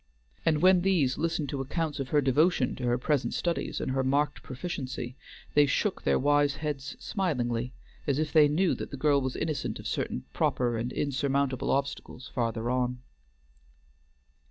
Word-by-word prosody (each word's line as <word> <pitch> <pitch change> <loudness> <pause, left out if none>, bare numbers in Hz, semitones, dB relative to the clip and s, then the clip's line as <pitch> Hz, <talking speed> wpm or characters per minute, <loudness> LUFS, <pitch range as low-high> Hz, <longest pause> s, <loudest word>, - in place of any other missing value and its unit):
And 155 0 +3
when 185 -1 +6
these 175 -9 +2
listened 160 -3 -1
to 135 0 -2
accounts 155 +2 -2
of 135 -1 -3
her 150 - +3
devotion 140 +1 +2
to 125 - -3
her 120 0 +2
present 140 +2 0
studies 170 -1 -1
and - - -2
her 130 0 +1
marked 145 +2 +1
proficiency, 130 -3 -5 0.4
they 145 -1 +5
shook 190 +8 0
their - - +2
wise 145 +1 +3
heads 145 -2 -4
smilingly, 125 - -1 0.4
as 140 -2 +2
if 155 -1 -1
they 155 -2 +7
knew 170 +5 +2
that - - -5
the 140 - -6
girl 140 0 +3
was 130 -1 -2
innocent 155 -3 -2
of - - -10
certain 65 - -2
proper 120 -2 +1
and 115 +2 -2
insurmountable 140 -1 0
obstacles 140 -2 -2
farther 115 -2 -2
on. 125 0 -1
140 Hz, 165 wpm, -29 LUFS, 130-150 Hz, 0.4 s, they